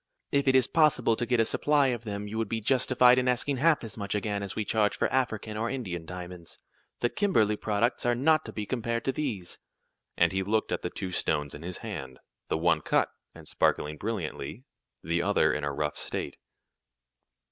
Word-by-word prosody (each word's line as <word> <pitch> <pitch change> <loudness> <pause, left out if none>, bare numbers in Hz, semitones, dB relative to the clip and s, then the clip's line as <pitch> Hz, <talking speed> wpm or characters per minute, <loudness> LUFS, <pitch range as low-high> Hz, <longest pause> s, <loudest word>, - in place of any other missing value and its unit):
"If 140 0 +1
it 130 - +5
is 130 -2 +6
possible 150 -6 +3
to 120 - -2
get 125 -1 +2
a 115 - +4
supply 145 +2 +2
of 120 -2 -3
them 105 -1 -4
you 110 +2 -4
would 110 -3 -1
be 115 - -1
justified 125 +1 +4
in 125 - 0
asking 125 +2 +1
half 155 +1 +3
as 115 -2 -7
much 100 0 -3
again 105 -1 -1
as 100 -2 -5
we 110 - -2
charge 105 -1 +1
for - - +2
African 110 -5 -1
or 115 +2 -1
Indian 95 -11 -4
diamonds. 90 -1 -8 0.4
The 120 - +2
Kimberly 115 - +2
products 105 +3 0
are 120 0 +2
not 155 +5 +3
to - - -6
be 105 - -4
compared 115 0 -2
to 135 - +2
these," 115 -12 -4 0.6
and 85 -1 +4
he 95 - 0
looked 110 +3 0
at - - -1
the - - -3
two 95 - -5
stones 75 -4 0
in 75 - -9
his 90 +2 -5
hand 65 -1 -6 0.3
the - - +1
one 85 +2 +2
cut, - - +2 0.3
and - - -12
sparkling 75 +1 0
brilliantly, 105 +3 -4 0.4
the 85 +1 0
other 100 +3 +3
in 75 - -3
a 70 - -1
rough 75 +1 -2
state. - - -3
110 Hz, 205 wpm, -28 LUFS, 90-125 Hz, 0.6 s, is